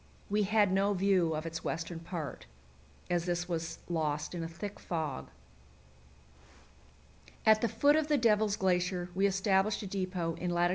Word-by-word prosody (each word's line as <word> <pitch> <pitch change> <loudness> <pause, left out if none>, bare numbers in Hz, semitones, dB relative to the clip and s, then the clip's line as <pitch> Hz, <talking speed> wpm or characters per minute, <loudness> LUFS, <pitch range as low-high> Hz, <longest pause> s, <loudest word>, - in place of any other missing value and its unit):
We 210 +1 +3
had 205 -1 +3
no 195 +2 +2
view 185 -4 +2
of 155 +1 -4
its 165 0 -5
western 165 +1 -3
part, 165 - -6 0.6
as 175 -1 0
this 175 0 -1
was 165 -2 -3
lost 155 -3 -1
in 170 -2 -3
a - - -3
thick 200 +5 -7
fog. 155 - -3 2.2
At 220 0 +6
the 235 - +2
foot 290 +7 +4
of 310 -1 +2
the 300 -1 +3
Devil's 215 -4 +3
Glacier 180 -2 0
we 195 +2 +3
established 195 +2 +1
a - - -5
depot 185 -3 -2
in 180 - -2
lat. 175 0 +2
180 Hz, 160 wpm, -32 LUFS, 170-200 Hz, 2.2 s, At